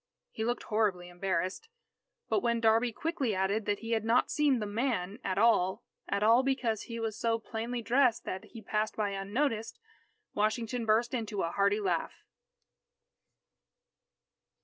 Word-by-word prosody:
He 220 - -4
looked 240 +2 -1
horribly 200 -5 0
embarrassed. 185 - -2 0.6
But - - +1
when 235 -5 +1
"Darby" 230 +1 +3
quickly 275 - -2
added 195 +3 0
that 205 -1 0
he 230 0 -5
had 225 -2 +1
not 230 +2 +2
seen 290 -3 +3
the 215 - -2
"man" 210 -2 -2
at 190 -1 -2
all 195 -4 +3 0.3
at 200 +1 0
all 230 +3 +6
because 260 -5 -1
he 230 0 -4
was 225 -2 -2
so 230 -1 +1
plainly 230 +2 -4
dressed 240 0 +3
that 185 - -5
he 225 -2 -11
passed 215 +2 -1
by 210 -2 -1
unnoticed, 225 +3 -2 0.6
Washington 225 +2 -1
burst 230 +3 +2
into 220 -5 -2
a 165 - -1
hearty 200 +2 +2
laugh. 180 -5 -2
220 Hz, 150 wpm, -31 LUFS, 200-235 Hz, 0.6 s, all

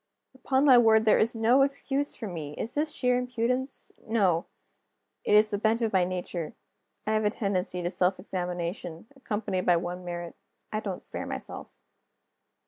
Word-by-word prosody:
Upon 265 +1 +1
my 255 -4 +8
word, 220 -1 +5
there 215 - +5
is 230 +2 +2
no 230 +4 +4
excuse 275 +1 0
for 230 - -6
me! 155 -5 -6
Is 230 - -4
this 300 +1 0
sheer 250 -4 +1
impudence? 250 +2 -2 0.2
No; 190 -7 +2 0.8
it - - +3
is 210 +1 +5
the 205 - -1
bent 225 +2 +2
of 220 - 0
my 185 -2 +4
nature. 175 -3 -4 0.5
I 215 - 0
have 215 0 +2
a 210 - +3
tendency 185 -4 -2
to 175 - 0
self 180 0 +1
examination, 175 -2 -4
accompanied 210 -7 -3
by 175 -1 +5
one 175 +1 -4
merit 175 -1 -6 0.4
I 215 - 0
don't 195 -4 -5
spare - - -5
myself. - - -7
210 Hz, 170 wpm, -28 LUFS, 180-240 Hz, 0.8 s, my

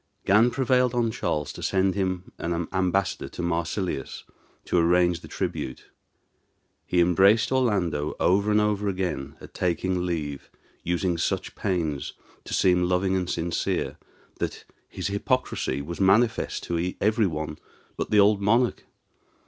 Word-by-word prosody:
Gan 105 +5 +5
prevailed 125 -1 +2
on 115 -2 +1
Charles 75 -8 -2
to - - -9
send 95 0 +1
him 95 -2 -2
as 85 - -3 0.2
ambassador 95 +1 0
to 90 - -6
Marsilius, 85 -2 -2 0.4
to 90 - +2
arrange 85 0 +3
the - - -12
tribute. 65 -1 -4 1.0
He 90 - +1
embraced 95 +7 +4
Orlando 95 - 0
over 100 +3 +3
and 105 0 +4
over 105 -1 0
again 90 -8 -3
at - - -13
taking 90 0 -1
leave, 75 -6 -4 0.3
using 90 0 -1
such - - -1
pains 80 -9 -2 0.3
to - - -6
seem 90 -1 +3
loving 90 +2 +1
and 90 -1 -1
sincere, 85 +1 -1 0.4
that - - -4 0.2
his - - -6
hypocrisy 100 - -1
was 85 +5 -6
manifest 105 +5 +2
to 85 +1 -2
every 110 0 +2
one 75 -2 -4 0.4
but - - -3
the 105 - +4
old 100 0 +5
monarch. 115 +5 +2
95 Hz, 140 wpm, -26 LUFS, 85-105 Hz, 1.0 s, Gan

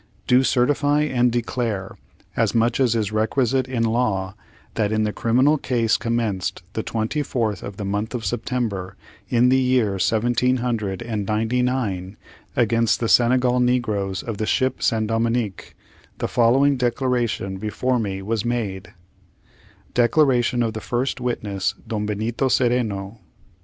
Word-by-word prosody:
Do 125 +1 +4
certify 145 +3 +2
and 125 -4 +2
declare, 115 -4 -2 0.4
as - - +1
much 115 +2 +2
as 125 -4 +3
is 105 -3 -1
requisite 125 +4 +1
in 125 -3 -1
law, 110 -5 0 0.4
that, 105 -2 0
in 110 0 +1
the 105 -1 -1
criminal 130 +6 +2
cause 115 -4 +1
commenced 115 -8 -2
the 110 - -2
twenty 115 +7 -2
fourth 115 -8 -2
of 100 -1 -8
the 105 - -4
month 105 +4 -2
of 115 -3 -4
September, 110 -4 -2 0.3
in 125 0 +4
the 130 +1 +4
year 125 -7 +1
seventeen 120 +5 +2
hundred 115 -5 -2
and 110 -4 -3
ninety 110 +3 0
nine, 105 -7 -2 0.4
against 115 -1 +2
the 125 +2 +3
negroes 110 -6 0
of 115 -3 -5
the 110 - -1
ship 130 -1 0
San 110 -2 +1
Dominick, 115 -2 -2 0.4
the - - -2
following 135 +4 +3
declaration 120 -6 -1
before 120 +5 -1
me 95 -3 -3
was 110 +1 -1
made: 105 -7 -3 1.0
Declaration 125 -1 +3
of 115 -1 -1
the 110 - -5
first 125 +4 -2
witness, 100 -5 -2
DON 105 -2 -2
BENITO 110 +5 -1
CERENO. 115 -5 0
115 Hz, 140 wpm, -22 LUFS, 105-125 Hz, 1.0 s, Do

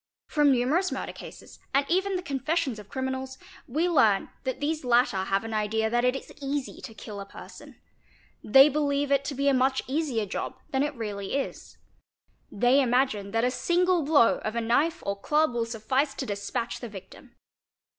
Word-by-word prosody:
From 295 -2 +3
numerous 275 +9 +2
murder - - -4
cases, - - -12 0.2
and 275 0 +3
even 380 +3 +1
the 360 - -3
confessions 280 -4 -1
of 205 -1 -12
criminals, 260 0 -4 0.3
we 310 +8 0
learn 220 - +3 0.2
that 260 - -2
these 305 +1 -2
latter 240 -6 +2
have 195 +1 0
an 225 0 -5
idea 220 +1 0
that 240 0 +2
it 250 +1 +2
is - - -8
easy 275 -1 -3
to 225 - -9
kill 210 -2 -8
a - - -7
person; - - -12 0.6
they 270 +6 +7
believe 285 -1 0
it 275 0 +3
to 285 - -3
be 280 +2 0
a 280 - +5
much 265 +1 +2
easier 265 -6 -1
job 200 - -5
than 265 - +1
it 290 0 -1
really 205 -3 -4
is; 275 - -4 0.7
they 245 +6 +4
imagine 245 -5 +1
that 225 +2 0
a 250 - +2
single 355 +4 +2
blow 285 -5 +4
of 215 +1 -4
a - - +1
knife 245 +9 +1
or 200 - -1
club 300 +7 +1
will 230 -1 -1
suffice 255 +6 -1
to 270 - -4
despatch 205 +1 -3
the 240 - -7
victim. 195 -2 -12
260 Hz, 185 wpm, -27 LUFS, 225-290 Hz, 0.7 s, they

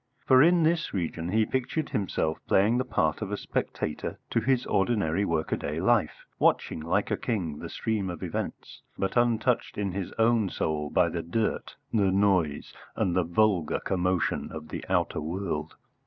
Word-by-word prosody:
For 130 0 +6
in 170 +2 +5
this 165 -5 +1
region 85 -2 -2
he 110 +3 +3
pictured 130 +5 -2
himself 95 - -1
playing 105 +6 +3
the - - +1
part 80 -10 0
of 105 -2 -4
a 105 - -1
spectator 75 - -3
to - - +2
his 130 -2 +1
ordinary 95 -4 +1
workaday 80 -2 -1
life, 105 -3 +1
watching, - - +2
like 80 +2 0
a - - +3
king, 85 -10 -2
the - - -6
stream 105 -4 -2
of 85 -2 -6
events, - - -5 0.2
but 95 - -2
untouched 120 0 +1
in 100 -2 -1
his 95 0 -4
own 115 -3 +3
soul 75 -3 -2
by 90 +2 +3
the 85 +1 -3
dirt, 105 +7 -2 0.2
the 100 -4 +3
noise, 95 -7 +1 0.2
and 90 - 0
the 90 - +3
vulgar 90 -1 +1
commotion 90 -1 0
of 80 -1 -8
the - - -5
outer - - +1
world. 80 -2 -3
95 Hz, 170 wpm, -27 LUFS, 80-115 Hz, 0.2 s, For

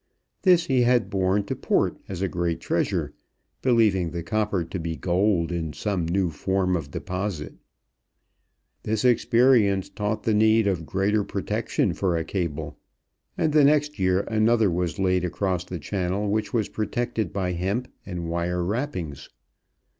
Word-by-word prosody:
This 180 -3 +5
he 130 -2 +2
had 120 -1 +2
borne 95 +1 +1
to 100 - -4
port - - 0
as 95 -1 -4
a - - +2
great 85 -2 -2
treasure, - - -1 0.5
believing 110 -8 +3
the 85 0 -5
copper 105 -1 0
to 90 +3 -5
be 80 0 -3
gold 90 -1 +1
in 80 -3 -3
some 90 +2 -2
new 90 0 +1
form 95 +3 0
of 80 -5 -4
deposit. 90 -2 -4 1.3
This 110 +2 -1
experience 115 -5 +4
taught 105 +1 -3
the 110 - +1
need 110 +1 +4
of 90 -6 -1
greater 100 +2 +1
protection - - -1
for 90 -4 0
a 80 - -1
cable, 80 -5 -4 0.6
and 155 - +1
the 150 -1 +6
next 150 +1 +3
year 95 0 +2
another 110 -1 +2
was 85 -2 -1
laid 95 -1 +1
across 90 0 -1
the 90 0 -5
Channel, 95 +5 -2
which 110 +1 -1
was 110 -4 0
protected 110 -2 -2
by 95 -2 -1
hemp 95 +8 -2 0.2
and 90 -3 -5
wire 85 +1 -1
wrappings. 90 - -3
95 Hz, 155 wpm, -25 LUFS, 85-110 Hz, 1.3 s, the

